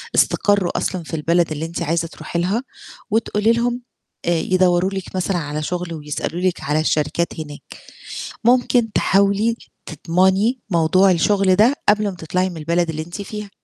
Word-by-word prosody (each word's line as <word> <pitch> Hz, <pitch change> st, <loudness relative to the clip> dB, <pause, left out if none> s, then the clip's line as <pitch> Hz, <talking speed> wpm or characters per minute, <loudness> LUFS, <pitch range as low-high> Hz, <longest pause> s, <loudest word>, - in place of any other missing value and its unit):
استقروا 200 Hz, -3 st, +2 dB
أصلًا 185 Hz, -2 st, -2 dB
في 160 Hz, -, -11 dB
البلد 165 Hz, +2 st, +1 dB
اللي 155 Hz, +1 st, -3 dB
أنتِ 165 Hz, +1 st, -5 dB
عايزة 165 Hz, +1 st, 0 dB
تروحي 170 Hz, -, -5 dB
لها 195 Hz, +8 st, 0 dB, 0.5 s
وتقولي 215 Hz, 0 st, +1 dB
لهم 240 Hz, +1 st, 0 dB, 0.4 s
آآ -, -, 0 dB
يدوّروا 185 Hz, 0 st, +2 dB
لِك 190 Hz, -1 st, -6 dB
مثلًا 185 Hz, 0 st, 0 dB
على 150 Hz, -2 st, -3 dB
شُغل 175 Hz, +1 st, -3 dB
ويسألوا 155 Hz, +2 st, -4 dB
لِك 185 Hz, -1 st, 0 dB
على 150 Hz, +2 st, 0 dB
الشركات 155 Hz, +2 st, 0 dB
هناك؟ 145 Hz, -2 st, -7 dB, 0.8 s
ممكن 240 Hz, -1 st, +3 dB
تحاولي 200 Hz, +4 st, +2 dB, 0.3 s
تضمني 190 Hz, -, +1 dB
موضوع 185 Hz, +2 st, +4 dB
الشُغل 190 Hz, +2 st, +3 dB
ده 225 Hz, +8 st, +4 dB
قبل 210 Hz, 0 st, +4 dB
ما 190 Hz, -, -7 dB
تطلعي 180 Hz, +3 st, -1 dB
من 175 Hz, -, -8 dB
البلد 170 Hz, +2 st, 0 dB
اللي 155 Hz, -1 st, -3 dB
أنتِ 175 Hz, +5 st, -7 dB
فيها. 210 Hz, 0 st, -7 dB
180 Hz, 160 wpm, -20 LUFS, 165-205 Hz, 0.8 s, موضوع